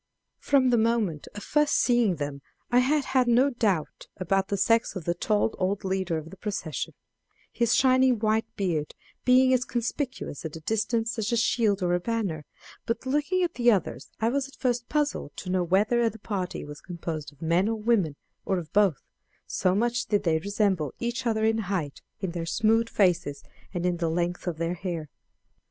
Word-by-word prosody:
From 265 -3 +3
the 240 - +4
moment 220 -9 0
of 205 - -7
first 300 0 +2
seeing 240 -7 +3
them 145 -2 -5 0.3
I 245 - +5
had 280 +3 +2
had 260 -2 +2
no 250 +4 +4
doubt 205 - -1
about 190 +1 0
the 200 - -1
sex 225 +4 +2
of 180 -5 -5
the 170 - +1
tall 210 +4 +1
old 190 +2 0
leader 190 -3 -1
of 160 +1 -7
the 195 - -11
procession, 180 - -4 0.6
his 235 0 +2
shining 260 -1 +4
white 215 +1 +1
beard 165 -6 -2 0.3
being 255 +1 +5
as 250 -1 +3
conspicuous 245 - -3
at 160 -1 -6
a - - -6
distance 225 +4 -1
as 215 +1 -1
a 235 - +2
shield 220 -4 +2
or 175 0 +1
a 175 - +2
banner; 190 -8 -2 0.4
but 230 - -2
looking 295 +7 +1
at 345 -1 -1
the 240 -1 +3
others 200 -7 0
I 225 +1 +2
was 275 +2 -1
at 275 - -16
first 245 -2 -1
puzzled 295 - -1
to 180 - -5
know 185 -1 +2
whether 215 +7 +2
the 225 - -11
party 195 -4 -4
was 145 0 -10
composed 165 -4 -5
of 145 - -24
men 170 +5 +2
or 225 - 0
women, 210 -9 +1 0.3
or 190 - 0
of 165 -3 -7
both, 195 - +3 0.4
so 185 -1 +1
much 240 +3 0
did 205 -1 +1
they 160 -3 +2
resemble 195 - 0
each 240 +1 -2
other 220 -1 +1
in 225 0 +2
height, 165 -8 -2 0.2
in 190 -3 -2
their 165 -1 -4
smooth 225 +4 +2
faces, 175 -7 +1 0.3
and 175 -2 -3
in 180 -1 +1
the 165 -1 0
length 175 +2 -2
of 170 -3 -2
their 165 +1 -1
hair. 170 -4 -5
205 Hz, 195 wpm, -27 LUFS, 175-235 Hz, 0.6 s, I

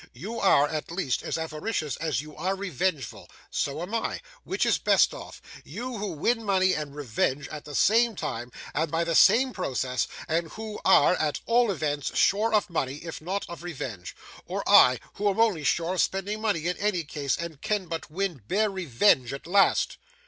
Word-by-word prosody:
You 210 - -6
are, 150 -7 +4
at 155 0 -4
least, 170 -7 -1
as - - -3
avaricious 155 - -3
as 155 -3 -1
you 150 0 -12
are 185 +5 -1
revengeful. 185 - -3 0.2
So 145 +4 -2
am 190 +5 -7
I. 230 - -1 0.2
Which - - -1
is - - +2
best - - +4
off? - - -10 0.2
You, 245 -2 -6
who 200 -3 -3
win 230 +10 0
money 190 -2 +2
and 150 -3 -4
revenge, 140 +1 -1
at 150 -1 -8
the 145 -1 -8
same 230 - +4
time 125 -7 -5 0.2
and 160 +2 0
by 165 +2 0
the 170 0 -1
same 255 +9 +5
process, 130 -7 -1 0.2
and 165 0 -1
who 215 -1 -7
are, 190 - +5
at 150 -2 -1
all 235 0 +3
events, 150 -5 -2
sure 215 +3 +3
of 215 -1 +2
money, 140 -7 -2
if 165 - -7
not 190 +5 -3
of 170 0 -9
revenge; 130 - -6 0.3
or - - -4
I, 125 -2 +7 0.2
who 205 0 +2
am 195 - -2
only 210 -9 +2
sure 170 +4 +1
of 185 - +2
spending 200 +3 -2
money 205 -8 0
in 180 +1 -1
any 200 -4 0
case, 145 -2 -2
and 170 -4 -7
can 210 -3 -1
but 165 -2 -5
win 175 -4 -3
bare 210 +2 +1
revenge 150 - +2
at 140 - -7
last? 195 +3 +3
170 Hz, 190 wpm, -27 LUFS, 150-200 Hz, 0.3 s, I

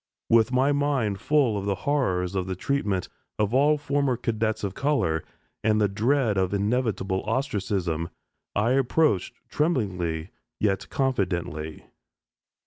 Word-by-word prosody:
With 115 +1 +5
my 130 +2 +3
mind 140 -9 0
full 140 -7 +3
of 100 - -5
the 100 -1 0
horrors 95 -11 +1
of 95 -1 -1
the 95 - -2
treatment 100 -4 -1 0.3
of 105 +1 0
all 145 +3 +4
former 140 -3 0
cadets 110 -2 -1
of 100 -2 -2
color, 135 - 0 0.4
and 110 0 +3
the 105 - +4
dread 110 +1 +1
of 95 +1 0
inevitable 100 -3 0
ostracism, 95 - -1 0.5
I 105 +4 +2
approached 135 - +2 0.2
tremblingly 95 - -1 0.3
yet 100 -2 0
confidently. 90 - -2
105 Hz, 130 wpm, -26 LUFS, 95-135 Hz, 0.5 s, With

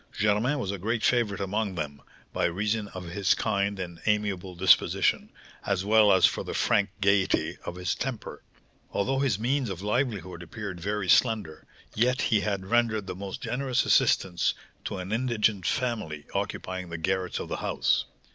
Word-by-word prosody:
Germain 105 +7 +2
was 100 -8 -2
a 100 - -5
great 110 +4 -1
favourite 115 -5 +2
among 100 0 -2
them, 75 -3 -5 0.3
by - - +1
reason 105 +4 -1
of 95 -3 -8
his 95 +1 +2
kind 100 0 0
and 85 -2 -6
amiable 100 -3 0
disposition, 95 +1 +3 0.3
as 95 -1 -1
well 105 0 +6
as 95 -3 +6
for - - +1
the - - -5
frank 100 0 +2
gaiety 100 -1 +2
of - - -5
his 90 -2 -1
temper. - - -5 0.5
Although 135 +6 0
his 135 -8 +1
means 125 +2 0
of 95 0 -6
livelihood 105 -6 -1
appeared 95 +1 -7
very 100 +2 -2
slender, 95 -5 +2 0.3
yet 125 +4 +2
he 110 - +5
had 100 -2 -2
rendered 115 -1 +1
the 95 - -5
most 95 +1 -7
generous 130 -1 0
assistance 90 -3 +3 0.3
to - - -3
an 95 +1 -6
indigent 110 -5 +1
family 105 - -2
occupying 95 -1 -3
the 80 - -5
garrets 95 +2 -1
of - - -4
the - - -2
house. - - +1
100 Hz, 165 wpm, -27 LUFS, 95-110 Hz, 0.5 s, well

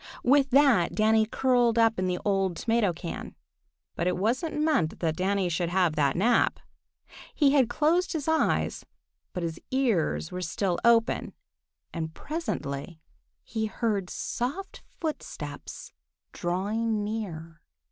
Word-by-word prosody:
With 275 +2 +4
that 265 -9 +4
Danny 220 0 +3
curled 245 -1 +2
up 225 -3 +3
in 185 - 0
the 180 0 0
old 195 -3 +1
tomato 225 -4 +1
can. 170 0 -7 0.6
But 170 - -1
it 180 - 0
wasn't 255 - -1
meant 300 - +1
that 160 -2 0
Danny 190 +1 0
should 175 0 -1
have 175 -3 +2
that 145 -3 +2
nap. 230 +6 +2 0.8
He 285 -3 +4
had 270 -5 +4
closed 340 +8 +1
his 315 -3 -3
eyes, 320 0 +1 0.5
but 180 - -4
his 165 -1 -4
ears 190 - 0
were 180 - -4
still 180 +1 -1
open, 230 -1 +3 0.6
and 160 -1 -4
presently 175 - -4 0.4
he 220 -1 -2
heard 205 -3 -1
soft 315 +12 -4 0.2
footsteps 315 -2 -6 0.4
drawing 210 +5 -1
near. 170 -6 -5
215 Hz, 130 wpm, -27 LUFS, 175-250 Hz, 0.8 s, With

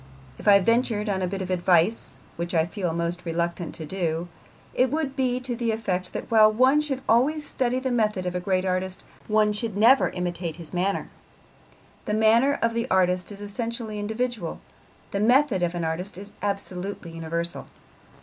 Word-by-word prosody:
If - - -8
I 200 -1 +8
ventured 225 0 +1
on 190 -2 0
a 185 - 0
bit 190 +1 -3
of 185 - -5
advice, 180 +3 +2 0.2
which 170 +1 -3
I 160 -1 +4
feel 175 -1 -3
most 170 +1 -2
reluctant 170 0 -2
to 160 - -7
do, 170 0 -2 0.4
it 255 +1 +3
would 290 -1 -2
be 255 -2 0
to 250 -1 -4
the 235 -1 -1
effect 185 -5 -2
that - - -6
while 215 -1 +7
one 260 +6 +4
should 270 -3 -3
always 295 +7 +3
study 255 -2 -1
the 260 0 -1
method 210 -6 +1
of 180 - -2
a 180 - -1
great 185 0 0
artist, 185 0 -2 0.2
one 215 -1 +3
should 210 -1 -2
never 240 +6 +5
imitate 175 -2 -3
his 165 0 -8
manner. 185 +3 -1 0.9
The 210 - 0
manner 230 +6 +4
of 230 0 +1
an 235 +1 -1
artist 180 0 +2
is 205 0 -9
essentially 220 +1 -4
individual, 220 -3 -3 0.5
the 200 - -1
method 245 -1 +3
of 175 0 0
an 170 - -2
artist 180 +5 -3
is 205 +1 -10
absolutely 195 -3 -4
universal. 165 +1 -4
200 Hz, 180 wpm, -25 LUFS, 180-230 Hz, 0.9 s, I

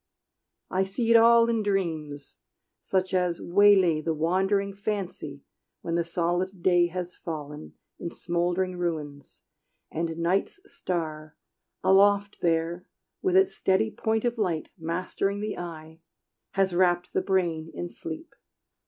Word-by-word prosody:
I 190 +1 +2
see 220 +5 -1
it - - +7
all 230 0 +7
in 230 -1 +1
dreams, 160 -8 -3 0.4
such 190 0 -1
as 180 -2 +1
waylay 190 -4 +4
The 160 +1 -1
wandering 190 +5 +1
fancy 195 -8 -4 0.4
when 165 - -4
the 170 0 +2
solid 175 +2 -2
day 175 -2 +4
Has 180 0 -5
fallen 150 -3 -7 0.2
in 170 - -4
smoldering 175 +2 -1
ruins, 150 -5 -5 0.5
and 165 0 -3
night's 185 - 0
star, 155 - -4 0.5
Aloft 200 +1 +4
there, 170 +1 0 0.3
with 375 -1 +1
its 385 0 +3
steady 195 +4 +1
point 220 0 -1
of 240 -1 -1
light 170 -7 -1
Mastering 185 +4 -2
the 210 0 -4
eye, 160 -2 -8 0.5
has 195 -2 +1
wrapped 175 0 +2
the - - +2
brain 170 -4 0
in 175 - -5
sleep. 165 - -8
180 Hz, 130 wpm, -27 LUFS, 165-195 Hz, 0.5 s, it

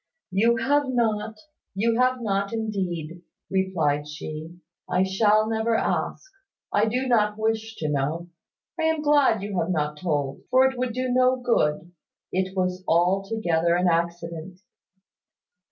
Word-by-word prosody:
"You 230 +5 +3
have 280 +4 +1
not, 220 -3 0 0.4
you 225 +4 +1
have 255 -1 +2
not 200 -2 -1
indeed," 180 -7 -3 0.3
replied 165 -7 0
she. 155 +2 -7 0.3
"I 180 +1 +2
shall 210 +3 +3
never 225 +1 0
ask. 385 - -2 0.4
I 210 +2 +3
do 250 +4 -1
not 210 -4 +2
wish 220 0 -1
to 155 - -3
know. 150 +4 -2 0.5
I 320 - +1
am 320 -1 +1
glad 285 -8 +3
you 200 -3 -2
have 165 - -1
not 150 -3 -1
told; 145 -5 -2
for 260 +1 +5
it 265 0 +1
would 250 -1 -2
do 255 +1 -2
no 255 +1 +4
good. 175 -10 0 0.4
It 190 +1 -2
was 185 0 -1
altogether 175 -1 +2
an 180 +1 +2
accident." 170 +1 -2
195 Hz, 140 wpm, -25 LUFS, 170-230 Hz, 0.5 s, for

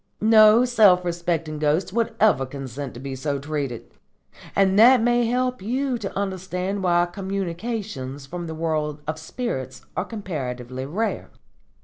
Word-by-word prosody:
No 215 +2 +6
self 205 -7 +5
respecting 170 -3 -2
ghost 155 +5 +1
would 230 0 0
ever 210 -11 +4
consent 135 0 -7
to - - -8
be 135 0 -5
so 140 +2 -2
treated; 140 -4 -4 0.6
and 195 0 +3
that 250 +3 +8
may 240 +1 +2
help 250 -1 0
you 250 +4 -1
to 195 -3 -5
understand 190 0 -3
why 175 -1 +3
communications 190 - -4
from 175 +4 -6
the 160 - -5
world 155 -2 -2
of 155 +1 -4
spirits 145 - -5
are - - -1
comparatively 130 - -5
rare. 215 +10 -2
180 Hz, 140 wpm, -23 LUFS, 145-215 Hz, 0.6 s, that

